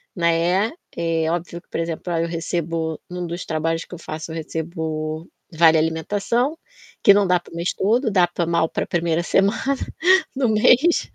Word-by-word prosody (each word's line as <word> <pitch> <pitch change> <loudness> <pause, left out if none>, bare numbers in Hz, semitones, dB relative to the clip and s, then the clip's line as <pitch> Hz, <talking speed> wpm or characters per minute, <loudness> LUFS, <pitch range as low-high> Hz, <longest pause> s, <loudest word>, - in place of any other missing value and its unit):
né, 175 +4 +2 0.3
é 165 -1 0
óbvio 170 0 -4
que, - - -42
por - - -3
exemplo, 165 +1 -3
ah, 165 - +1
eu 170 - -1
recebo, 165 -1 -3
num 180 0 -4
dos 170 +2 -5
trabalhos 165 +1 -1
que - - -13
eu - - -11
faço, 155 0 -7
eu - - -6
recebo 160 0 -4 0.3
vale 160 0 +5
alimentação, 205 - 0 0.5
que 200 - +8
não 205 0 +3
dá 180 0 +3
para 175 - -17
o - - -9
mês 170 +1 -1
todo, 225 +5 +1
dá 180 -3 +4
pra 175 0 -2
mal 170 -1 +2
pra - - -2
1º 170 -1 0
semana 195 +4 +2 0.7
do 260 -4 +1
mês. 250 +10 +4
170 Hz, 185 wpm, -22 LUFS, 160-185 Hz, 0.7 s, que